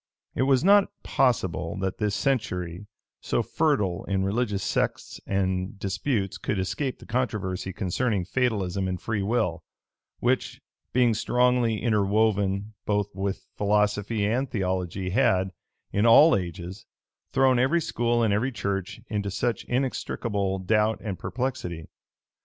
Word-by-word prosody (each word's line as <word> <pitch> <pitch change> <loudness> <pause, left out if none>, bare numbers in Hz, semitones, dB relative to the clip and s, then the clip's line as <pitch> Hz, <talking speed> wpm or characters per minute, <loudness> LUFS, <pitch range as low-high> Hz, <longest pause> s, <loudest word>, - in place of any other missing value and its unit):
It - - -1
was 135 0 +4
not 200 +1 +6 0.2
possible 95 -8 0
that 95 0 -3
this 105 -1 0
century, 95 -8 -1 0.3
so - - 0
fertile 135 - 0
in 95 -1 0
religious 100 -1 -1
sects - - -1
and 95 0 -1
disputes, 100 +1 -2
could 105 - -2
escape 125 +8 -2
the - - -14
controversy 105 -7 -2
concerning 95 +2 -1
fatalism 100 -5 0
and 90 -1 -3
free 105 -3 -2
will, 90 -6 0 0.5
which, - - 0 0.3
being 120 -2 +3
strongly 120 0 +2
interwoven 105 -2 +1
both 105 -1 0
with 95 +1 -3
philosophy 105 +1 +1
and 125 +5 0
theology 95 -2 -2
had, 95 -5 +2 0.4
in 105 +3 +2
all 150 +8 +8
ages, 90 +2 -5 0.4
thrown 130 -2 +4
every 135 +7 +3
school 120 -6 0
and 105 -3 +2
every 120 +6 +1
church 100 -2 -3
into 100 -2 -2
such 115 +3 -1
inextricable 115 -6 -1
doubt 105 +3 +1
and 100 -5 -4
perplexity. 115 -11 -3
105 Hz, 130 wpm, -26 LUFS, 95-120 Hz, 0.5 s, all